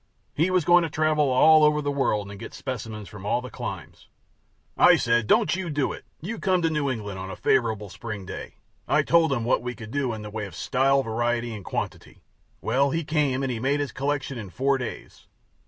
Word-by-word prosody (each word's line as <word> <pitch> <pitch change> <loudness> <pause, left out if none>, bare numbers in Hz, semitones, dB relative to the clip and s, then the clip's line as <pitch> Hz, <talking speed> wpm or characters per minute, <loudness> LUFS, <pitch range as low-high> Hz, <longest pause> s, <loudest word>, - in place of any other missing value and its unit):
He 165 +5 +1
was 185 -4 +2
going 175 +1 +6
to 165 - -1
travel 150 -1 +2
all 155 +4 +6
over 150 0 +4
the 145 -1 -1
world 105 -8 0
and 100 - -10
get - - -8
specimens 110 -5 -6
from 105 -2 -11
all 105 +4 +1
the 125 0 -8
climes. - - -7 0.7
I - - +7
said, 115 -2 +1
�Don't - - +4
you 185 -2 -4
do 145 -3 0
it; - - -11 0.2
you 215 +8 -5
come 185 -3 +1
to 165 - +2
New 150 -3 0
England 105 -6 -4
on 95 0 -6
a 95 - -6
favorable 110 -5 +1
spring 105 0 -7
day.� - - -7 0.3
I - - +3
told 165 -2 +4
him 120 -4 0
what - - +2
we 125 0 -5
could 110 -1 -9
do 140 -2 -1
in 110 -1 -6
the 105 - -7
way 105 -1 -4
of 90 - -12
style, 135 +6 +2
variety, 120 0 -1
and 105 -3 -8
quantity. - - -5 0.4
Well, 135 +5 +2
he 165 +4 -1
came 145 -4 0
and 135 - -1
he 115 - -3
made 140 +4 +1
his 145 -4 -2
collection 135 -1 -2
in 100 -4 -7
four 135 +7 +1
days. 125 - -8
130 Hz, 220 wpm, -25 LUFS, 110-150 Hz, 0.7 s, I